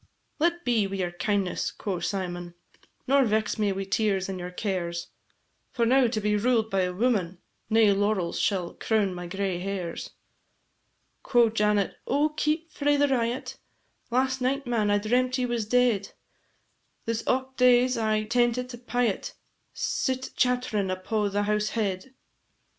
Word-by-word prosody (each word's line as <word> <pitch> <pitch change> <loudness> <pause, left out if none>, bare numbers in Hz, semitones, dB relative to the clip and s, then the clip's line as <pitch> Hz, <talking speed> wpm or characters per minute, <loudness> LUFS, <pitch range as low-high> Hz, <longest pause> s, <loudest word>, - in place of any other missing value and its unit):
"Let 345 +2 +1
be 230 -5 +2
wi' 195 - -5
your 180 -2 -2
kindness," 190 +1 -1
quo' 190 -4 -4
Symon, 175 -1 -4 0.5
"Nor 275 +1 +4
vex 215 -2 0
me 205 -2 +2
wi' 195 0 -3
tears 195 -1 0
and 190 -1 -5
your 180 0 -5
cares, 180 -3 -3 0.6
For 235 -2 0
now 255 +1 +4
to 225 -1 -1
be 210 0 +1
ruled 220 0 +1
by 195 -1 +2
a 180 0 0
woman, 190 -4 0 0.3
Nae 220 -2 +5
laurels 195 -3 0
shall 185 -4 0
crown 210 -4 0
my 175 0 -6
gray 190 0 -2
hairs." 185 -3 -4 1.1
Quo' 240 -3 +3
Janet, 210 -2 +1
"Oh, 290 +3 +2
keep 310 +2 -1
frae 290 0 +1
the 285 0 +3
riot! 245 0 -1 0.5
Last 260 +2 +1
night, 275 +2 0
man, 230 -4 +1
I 205 - +4
dreamt 250 +5 +1
ye 255 - 0
was 235 -3 -2
dead; 235 -4 +2 0.9
This 230 0 -2
aught 260 +1 0
days 250 0 +4
I 215 -1 +1
tentit 240 +2 0
a 240 - -8
pyot 245 -4 -1 0.4
Sit 260 0 -1
chatt'rin' 245 -6 +1
upo' 205 +3 -1
the 205 +1 0
house 210 +1 0
head. 210 +4 -2
215 Hz, 155 wpm, -27 LUFS, 195-250 Hz, 1.1 s, Nae